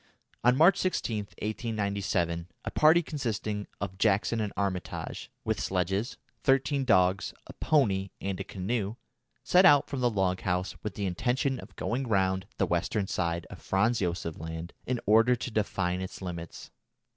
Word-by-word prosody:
On 125 +1 +5
March 170 +6 +6
16, 150 -11 0 0.3
1897, 100 -6 -1 0.2
a - - -3
party 160 +3 +5
consisting 110 -8 -3
of 95 -1 -5
Jackson 110 +2 +2
and 105 -2 -2
Armitage, 95 -3 -3
with - - -1
sledges, 95 +4 -1 0.2
thirteen 135 +2 +2
dogs, 95 -4 +3
a - - -10
pony, 100 -11 +2
and 95 -1 -3
a - - -2
canoe, 100 +3 -2 0.5
set 180 +1 +5
out 145 -5 +6
from 140 - -4
the 120 - +4
log 95 -4 0
house 90 0 -1
with 105 -2 -5
the 100 - -2
intention 125 +8 0
of - - -12
going 125 +3 -2
round 95 -2 +1
the 95 - +2
western 90 +4 0
side 85 -2 -1
of - - -10
Franz 110 +5 +2
Josef 85 -3 -2
Land 80 +1 -6
in 125 -1 0
order 115 +4 +5
to 125 - -5
define 95 -4 0
its 95 - -6
limits. 85 -3 -7
100 Hz, 155 wpm, -29 LUFS, 90-120 Hz, 0.5 s, March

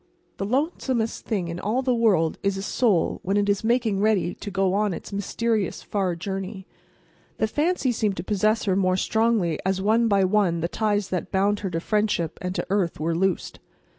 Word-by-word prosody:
The 195 - -3
lonesomest 260 - -1
thing 195 -6 -1
in 170 +1 -5
all 230 +8 -1
the 255 -1 +2
world 200 -9 +2
is 200 -1 0
a 195 - -4
soul 210 -5 +1
when 195 +2 0
it 205 0 +2
is 200 0 +1
making 230 -3 +1
ready 205 -4 +2
to 205 - -7
go 195 -1 +1
on 205 -2 +1
its - - -9
mysterious, 210 +1 -1
far 190 -4 -1
journey. 190 +2 -5 0.7
The - - +2
fancy 295 +3 0
seemed 215 -4 -1
to - - -3
possess 215 +3 +1
her 190 -2 +1
more 185 -1 +2
strongly 220 -6 +1
as 190 0 0
one 220 +4 +3
by 200 -3 +3
one 185 -3 +2
the 170 - 0
ties 205 0 0
that 185 -1 -3
bound 200 +2 +2
her 195 - -3
to 165 -2 -2
friendship 210 -4 0
and 180 -1 -3
to 175 - -2
earth 190 -6 0
were 165 +2 0
loosed. 185 +1 -1
200 Hz, 195 wpm, -24 LUFS, 185-220 Hz, 0.7 s, one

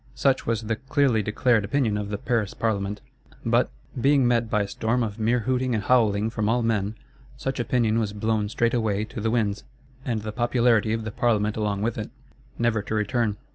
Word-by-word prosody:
Such 135 -1 +1
was 115 -1 0
the 110 0 -2
clearly 130 -3 +1
declared 105 +2 +2
opinion 115 0 0
of 105 -1 -3
the 105 - -2
Paris 110 -2 -1
Parlement. 105 -2 -1 0.4
But, - - +3 0.3
being 140 -1 +4
met 120 -2 +1
by 105 -1 +2
a - - -5
storm 115 +4 0
of 105 -1 -4
mere 115 +2 +2
hooting 130 +1 0
and 105 - -1
howling 110 -2 +2
from 110 -2 -1
all 120 +1 +2
men, 110 -2 0 0.4
such 135 0 -3
opinion 115 -2 +1
was 110 -3 -1
blown 105 0 -1
straightway 110 -3 +1
to 110 0 -6
the 110 - 0
winds; 110 -3 0 0.4
and 115 -6 -2
the 110 - -4
popularity 120 -1 +2
of 115 0 -2
the 110 - -4
Parlement 110 -3 +1
along 105 -2 -1
with 115 0 -1
it,—never 110 +1 -4
to 110 - -4
return. 110 0 0
110 Hz, 190 wpm, -25 LUFS, 105-120 Hz, 0.4 s, being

